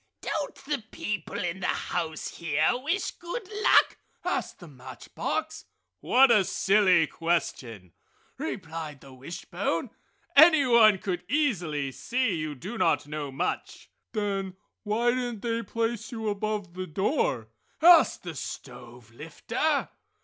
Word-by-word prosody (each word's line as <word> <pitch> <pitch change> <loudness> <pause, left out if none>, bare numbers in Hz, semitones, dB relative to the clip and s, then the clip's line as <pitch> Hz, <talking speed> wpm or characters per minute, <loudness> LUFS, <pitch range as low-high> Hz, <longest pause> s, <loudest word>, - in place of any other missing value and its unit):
"Don't - - -3
the 285 -5 -2
people 210 -6 -4
in 175 +1 -3
the 185 - -2
house 160 -3 -2
here 155 -2 +2
wish 305 +10 -1
good 370 +5 -7
luck?" - - +5 0.3
asked - - -2
the 175 - -12
match 130 -4 -12
box. - - -3 0.3
"What 255 - +5
a 210 -4 +5
silly 190 -3 +3
question!" 125 - -3 0.5
replied 160 -4 -5
the 135 - -13
wishbone, 170 - -4 0.4
"Anyone 260 - +7
could 180 -2 -3
easily 175 - 0
see 245 - -1
you 155 -3 -3
do 195 - -7
not - - +2
know 145 -1 -5
much!" 135 - -4 0.2
"Then 195 -3 -2 0.3
why 225 +3 +1
didn't 245 -4 -3
they 230 -1 -1
place 230 +3 -3
you 220 -2 -3
above 205 -3 -3
the 185 0 -5
door?" 155 - 0 0.3
asked 335 0 +6
the 175 -2 -6
stove 120 -4 -9
lifter. 230 - -2
190 Hz, 125 wpm, -27 LUFS, 155-235 Hz, 0.5 s, Anyone